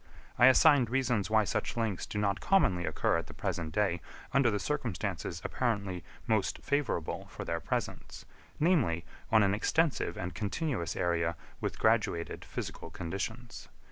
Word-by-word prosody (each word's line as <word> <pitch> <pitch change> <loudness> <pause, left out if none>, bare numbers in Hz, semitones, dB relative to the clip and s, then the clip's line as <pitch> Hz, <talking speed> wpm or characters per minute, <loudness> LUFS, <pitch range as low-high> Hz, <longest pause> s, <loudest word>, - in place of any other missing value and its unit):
I 120 - +9
assigned 130 -2 +6
reasons 120 -7 +1
why 110 0 +4
such 105 - -2
links 110 -5 -1
do - - -5
not 100 -1 +1
commonly 95 - +3
occur - - +1
at - - -7
the - - -11
present 80 -2 -3
day 90 -2 +1 0.3
under 135 -2 +5
the 105 - 0
circumstances 100 - -3
apparently 100 -8 -1 0.2
most 110 -4 +1
favourable 140 - -1
for - - -7
their 85 - -1
presence, 75 - -4 0.3
namely, 140 - +2 0.3
on 110 -2 +6
an 100 0 +3
extensive 130 - +1
and 90 -1 -4
continuous 105 - -2
area 85 -1 0 0.2
with - - -3
graduated 85 0 +1
physical - - -6
conditions. 100 +8 -5
105 Hz, 145 wpm, -31 LUFS, 85-125 Hz, 0.3 s, I